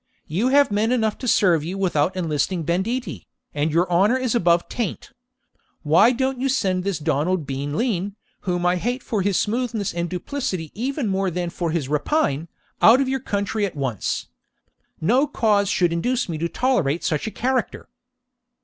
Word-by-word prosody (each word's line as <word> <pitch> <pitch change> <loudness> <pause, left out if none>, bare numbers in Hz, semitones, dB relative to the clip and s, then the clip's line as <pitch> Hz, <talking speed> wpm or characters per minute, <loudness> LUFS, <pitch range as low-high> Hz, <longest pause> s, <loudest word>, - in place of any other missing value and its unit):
You 190 +11 0
have 280 -2 +4
men 215 +3 +1
enough 220 -4 +1
to 255 - -5
serve 175 -9 +3
you 180 +5 -4
without 180 -2 +1
enlisting 165 +1 -1
banditti, 195 - -2 0.3
and 150 +2 0
your 170 +4 +2
own 170 - +3
honour 240 +5 +3
is 255 -3 -1
above 170 -6 +2
taint. 235 +2 -4 0.7
Why 160 +10 +5
don't 260 +1 -1
you 270 - +1
send 190 -8 0
this 195 -3 -1
Donald 155 +3 0
Bean 140 +2 -3
Lean, 205 -5 -1 0.2
whom 175 -2 -2
I 180 +1 +3
hate 245 +7 -2
for 215 -4 -1
his 195 -1 +1
smoothness 225 -2 -1
and 170 0 -2
duplicity 185 - -4
even 260 +3 -2
more 195 -1 0
than 175 0 -3
for 170 -1 -2
his 160 -4 -1
rapine, 150 - 0 0.3
out 235 +4 +7
of 270 -1 +1
your 265 0 0
country 205 -2 -2
at 195 -5 -2
once? 130 -8 -2 0.7
No 250 - +3
cause 210 -8 +2
should 175 -2 +2
induce 245 +10 0
me 165 -3 -4
to 170 +1 -1
tolerate 175 - 0
such 155 +3 -1
a - - -3
character.' 255 +1 -2
190 Hz, 175 wpm, -22 LUFS, 170-240 Hz, 0.7 s, out